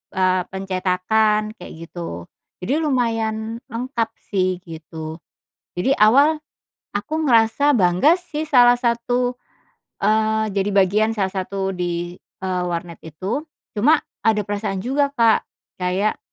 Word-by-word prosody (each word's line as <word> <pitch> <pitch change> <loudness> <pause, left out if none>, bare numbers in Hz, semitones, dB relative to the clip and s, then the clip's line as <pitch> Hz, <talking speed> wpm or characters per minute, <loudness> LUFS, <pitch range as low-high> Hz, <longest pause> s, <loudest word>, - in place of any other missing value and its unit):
eee, 185 0 +2
pencetakan 195 +3 0
kayak 180 - -9
gitu. 160 - -7 0.4
Jadi 245 - 0
lumayan 225 -6 -1
lengkap 235 -1 -2 0.2
sih, 185 -2 0
gitu. 160 -1 -8 0.6
Jadi 180 +10 +2
awal, 280 +9 +5 0.6
aku 310 +10 -3
ngerasa 245 +3 +4
bangga 185 - +4
sih 345 -4 -6
salah 245 -3 +7
satu, 245 +1 0 0.7
eee, 220 +1 +2
jadi 195 +1 0
bagian 205 +3 +3
salah 195 -3 0
satu 195 +1 -3
di, 175 -1 -3 0.3
eee, 185 -1 -1
warnet 170 -1 -4
itu, 190 - -4 0.3
cuma 290 +10 +5 0.3
ada 220 -1 +2
perasaan 200 -1 -3
juga 280 +3 +1
Kak 230 -3 +3 0.3
kayak 185 +3 0
215 Hz, 120 wpm, -21 LUFS, 185-235 Hz, 0.7 s, salah